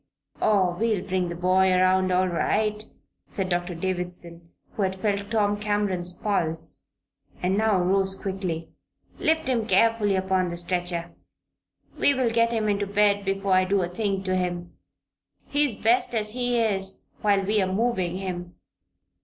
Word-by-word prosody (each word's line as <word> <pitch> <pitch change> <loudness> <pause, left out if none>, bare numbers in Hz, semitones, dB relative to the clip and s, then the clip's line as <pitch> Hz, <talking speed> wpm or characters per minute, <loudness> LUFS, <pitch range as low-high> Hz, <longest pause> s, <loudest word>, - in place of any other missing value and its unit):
"Oh, 190 -4 +3
we'll 220 -5 +1
bring 185 -1 0
the 170 - -5
boy 185 +2 +3
around 185 0 +3
all 185 +1 +3
right," 210 +4 0 0.4
said 190 -2 -3
Doctor 175 0 -1
Davison, 175 -1 -4 0.2
who - - -5
had 190 -1 0
felt 200 0 -1
Tom 205 -2 +1
Cameron's 205 -4 -1
pulse 165 -5 -2 0.6
and 185 +2 +2
now 215 -1 +2
rose 190 +1 +1
quickly. 185 -5 -4 0.5
"Lift 320 -2 +1
him 235 -4 0
carefully 225 -4 +3
upon 190 -1 +1
the 170 - -5
stretcher. 175 -1 -3 0.9
We 285 - +4
will 255 -3 +1
get 230 0 +2
him 220 -2 0
into 205 -1 0
bed 205 0 +2
before 195 0 0
I 185 0 +5
do 190 0 +1
a - - -1
thing 195 +1 -2
to 185 -1 0
him. 175 -1 -3 0.7
He's 290 -5 +1
best 240 +3 +2
as 215 -1 0
he 245 +1 0
is 195 -4 0 0.2
while 200 -2 +3
we 210 +1 +2
are 185 0 0
moving 190 -4 0
him." 180 -2 -5
195 Hz, 155 wpm, -25 LUFS, 180-210 Hz, 0.9 s, I